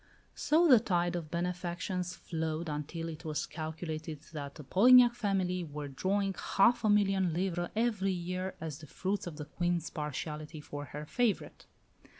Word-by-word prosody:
So 325 +4 +3
the 255 -6 +8
tide 175 -5 0
of 165 -3 -4
benefactions 180 +1 -2
flowed 160 0 -3
until 150 +3 -4
it 165 0 -7
was 155 -3 -2
calculated 155 -1 -5
that 140 -2 -6
the 150 - -9
Polignac 240 - +7
family 190 -5 0
were 150 -2 -6
drawing 195 +8 0 0.2
half 235 +4 +5
a 215 - +3
million 195 -4 +3
livres 175 -1 -1
every 215 -4 +1
year 185 +1 -3
as 155 -2 -5
the 155 - -11
fruits 190 +6 -2
of 165 - -6
the 150 - -5
Queen's 175 +1 -1
partiality 150 +1 -5
for 145 -1 -7
her 150 +1 -7
favourite. 235 +5 -1
175 Hz, 155 wpm, -32 LUFS, 155-195 Hz, 0.2 s, the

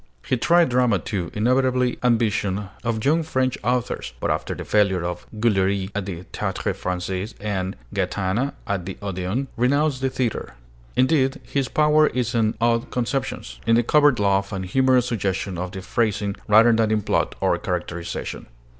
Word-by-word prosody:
He - - +1
tried 170 +6 +4
drama, 125 -4 +3
too, 90 -1 -3
inevitable 125 +2 +2
ambition 110 -5 +1
of 115 -1 -2
young 160 +4 +3
French 130 -5 0
authors; 125 0 -1
but - - 0
after - - -2
the - - -7
failure 100 -4 +2
of 90 0 -4
'Guillery' 100 -3 +1
at 100 -2 -3
the 90 -2 -5
Théâtre - - -2
Française 90 +3 -3
and 95 -3 -2 0.2
'Gaétena' 105 +8 -1
at 95 -3 -3
the 95 - -5
Odéon, 100 +5 -3
renounced 135 +3 +1
the 135 - +1
theatre. 120 - -3 0.4
Indeed, 135 0 +2
his 140 -2 -1
power 150 0 +4
is 125 -2 -1
in 110 -2 +1
odd 115 0 +1
conceptions, 125 - -3
in 115 - +5
the 120 - +3
covert 145 +1 +4
laugh 100 -1 +1
and 95 -1 -3
humorous 130 +5 +3
suggestion 95 -5 -2
of 90 +1 -4
the 95 -2 -7
phrasing, 105 -1 0
rather 110 +3 +6
than 110 -1 +2
in 110 -1 +1
plot - - 0
or - - +1
characterization. 85 -1 -4
110 Hz, 165 wpm, -23 LUFS, 95-125 Hz, 0.4 s, rather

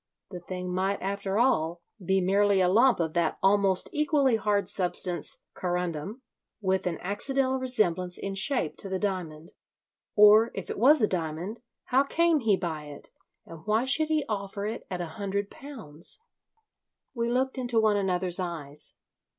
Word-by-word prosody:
The 180 - -6
thing 180 0 -5
might, 190 +2 0
after 200 +1 -2
all, 170 -8 +1 0.2
be 190 +2 +2
merely 200 +2 +3
a 185 - +4
lump 235 +6 +4
of 160 -2 -1
that 170 -2 0
almost 195 -1 +4
equally 290 -4 +2
hard 205 -3 0
substance, 180 -3 -1
corundum, 180 - -3 0.4
with 190 -2 0
an 170 - -2
accidental 260 +7 0
resemblance 185 -8 0
in 195 - -4
shape 195 - -1
to 195 - -8
the 190 - -1
diamond. 175 -6 -4 0.6
Or 210 +2 +7
if 195 - -5
it - - -5
was 270 +2 +5
a - - +5
diamond, 175 +5 -3 0.2
how 260 +1 +3
came 330 +3 +2
he 220 -6 +2
by 160 -5 -4
it, 145 -1 -11 0.3
and 165 -1 -11
why 220 +4 +2
should 310 +4 +3
he 310 -2 0
offer 200 -1 -4
it 220 +3 -5
at 180 -1 -3
a - - -2 0.2
hundred 200 0 -2
pounds? 200 - -8 0.9
We 235 -2 -1
looked 260 +2 0
into 240 -2 +1
one 215 -1 +3
another's 185 -2 0
eyes. 155 -5 -4
195 Hz, 160 wpm, -27 LUFS, 180-235 Hz, 0.9 s, Or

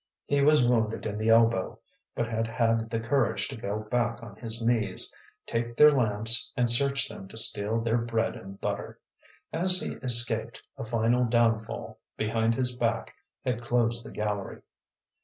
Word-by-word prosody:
He 145 0 0
was 150 -2 +4
wounded 115 -3 0
in 105 -1 -4
the 110 +1 0
elbow, 115 -4 +3 0.4
but 120 - -2
had 115 0 -2
had 115 -1 0
the 115 - -2
courage 120 0 0
to 135 - -7
go 105 -2 -4
back 120 -1 -1
on 105 -3 -11
his 115 +1 -2
knees, 115 -3 +1 0.3
take 115 0 -4
their 150 0 +8
lamps, 115 -3 +3
and 125 -1 +2
search 135 +3 +4
them 95 - -10
to 110 - -8
steal 110 0 +4
their 115 +1 0
bread 115 -1 -2
and 95 +1 -11
butter. - - -5 0.5
As 180 +3 +2
he - - -4
escaped, 115 -2 +2 0.2
a - - -7
final 115 +2 +1
downfall 115 -1 -1 0.2
behind 115 +1 0
his 125 -1 -2
back 115 -2 -2 0.3
had 125 -2 -2
closed 120 -1 0
the - - -10
gallery. 105 -2 -5
115 Hz, 165 wpm, -27 LUFS, 110-120 Hz, 0.5 s, their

